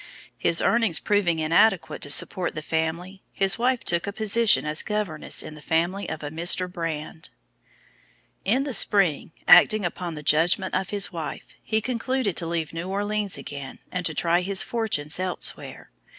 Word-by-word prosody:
His 165 - +1
earnings 225 -7 +2
proving 200 -5 +1
inadequate 165 +1 +2
to 145 - -3
support 175 +4 +2
the 155 - -5
family, 165 +5 -3
his 195 +3 +1
wife 250 0 +1
took 170 +2 -1
a - - -2
position 220 +1 +2
as 150 0 -1
governess 210 -7 -2
in - - -9
the 150 - -13
family 170 +6 -1
of - - -6
a 145 - -5
Mr. 175 +3 +2
Brand. 165 -2 -6 1.1
In 245 +8 +2
the 280 -2 -4
spring, 195 -10 +3 0.2
acting 215 -4 +6
upon 175 -1 -4
the 150 - -8
judgment 170 +6 +2
of 190 0 -1
his 205 -1 0
wife, 165 -3 -7
he 220 0 -1
concluded 250 -3 -2
to 170 - -1
leave 165 -2 -3
New 165 +3 -5
Orleans 205 0 -1
again, 140 -2 -8
and 180 -1 -3
to 160 - -6
try 170 +3 +2
his 190 +1 +1
fortunes 190 -10 -1
elsewhere. 185 -1 -4
180 Hz, 165 wpm, -24 LUFS, 160-205 Hz, 1.1 s, acting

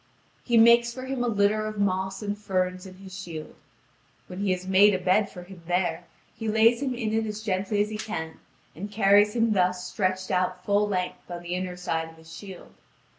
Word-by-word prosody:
He 235 -2 +2
makes 235 +1 +6
for 255 +2 -8
him 260 -2 -2
a - - 0
litter 215 0 +2
of 215 0 -6
moss 190 0 -1
and 205 0 -2
ferns 185 -2 -2
in 185 - -12
his 190 0 -11
shield. 170 -5 -7 0.7
When 180 - -9
he 200 -1 0
has 185 0 -1
made 190 +2 +5
a - - +1
bed 190 +3 +2
for 180 - -10
him 180 -1 -13
there, 175 -1 0 0.3
he 225 - -5
lays 225 +3 +4
him 260 -3 -1
in 220 -3 -2
it 220 0 0
as 215 0 -5
gently 205 0 0
as 210 - -6
he 215 - -5
can, 160 -7 -5 0.4
and 200 +5 -6
carries 205 +1 +4
him 230 -1 +2
thus 180 -2 +1
stretched 185 -1 -2
out 180 0 -1
full 205 +1 +2
length 185 -3 -3
on 175 0 -6
the 175 0 -4
inner 180 0 -3
side 165 -2 -2
of 165 - -17
his 160 0 -13
shield. 190 0 -11
195 Hz, 215 wpm, -26 LUFS, 180-215 Hz, 0.7 s, makes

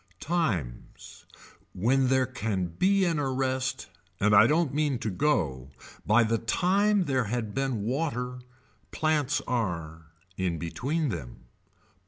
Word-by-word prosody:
Times. 105 - -3 0.5
When 130 +7 +2
there 130 0 +3
can 110 -7 -2
be 190 - +2
an 165 -3 0
arrest 130 -1 -1 0.3
and 105 +1 +3
I 105 +2 +8
don't 155 0 +1
mean 145 -3 +1
to 115 -2 -3
go, 80 - 0 0.4
by 110 +3 +5
the 115 0 0
time 195 - +2
there 130 -6 0
had 110 -1 -3
been 135 -6 -1
water, 125 -1 -2 0.5
plants 150 -3 0
are, 85 -9 -3 0.3
in 90 -3 -1
between 140 - -2
them. - - -7
125 Hz, 125 wpm, -27 LUFS, 100-150 Hz, 0.5 s, I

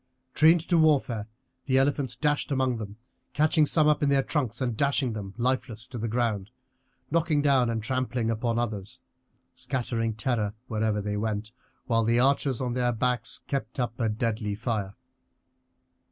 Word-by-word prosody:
Trained 160 +2 +5
to 170 -2 +3
warfare 130 -9 +2 0.4
the 130 -1 +3
elephants 135 -3 +1
dashed 145 +3 0
among 130 -3 +1
them, 105 -1 -7 0.4
catching 155 +1 +3
some 155 0 +4
up 150 -1 +3
in 145 - +2
their 140 -1 +3
trunks 125 -7 -1
and 120 -3 -1
dashing 140 -1 +1
them 100 -2 -6
lifeless 120 -2 -1
to 120 - -7
the 115 - -2
ground, 110 -4 -1 0.6
knocking 160 -2 +2
down 135 -4 +4
and 115 -2 -2
trampling 125 -1 -1
upon 115 +1 -1
others, 105 -5 -3 0.5
scattering 120 -3 -2
terror 110 -2 -1
wherever 110 -2 -1
they 105 0 -2
went, 105 0 -2 0.3
while 115 -2 +2
the 115 +2 +2
archers 135 -1 +2
on 125 -2 -1
their 125 -1 +1
backs 125 +1 -1
kept 130 -2 -4
up 120 -1 -2
a 115 -2 +1
deadly 105 -1 -2
fire. 105 -3 -3
120 Hz, 160 wpm, -27 LUFS, 110-135 Hz, 0.6 s, Trained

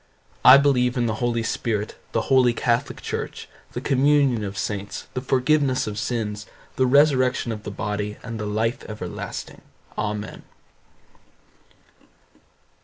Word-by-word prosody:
I 130 - +10
believe 130 -3 +2
in 120 - +1
the 110 - 0
Holy 120 -1 0
Spirit, 110 -2 -2 0.2
the 115 - +1
holy 130 -2 +4
catholic 120 0 -1
church, - - -5 0.3
the - - -4
communion 135 -4 +3
of 100 -1 -5
saints, 100 +1 -4
the 125 - -3
forgiveness 130 +1 +2
of 105 -1 -4
sins, 105 -2 -3 0.3
the 130 - +2
resurrection 130 -3 +3
of 110 -1 -5
the - - -6
body, 105 0 -3
and 115 -2 -6
the 105 - -3
life 110 +4 -1
everlasting. 100 -5 -6 0.4
AMEN. 105 0 -4
115 Hz, 130 wpm, -23 LUFS, 105-130 Hz, 0.4 s, I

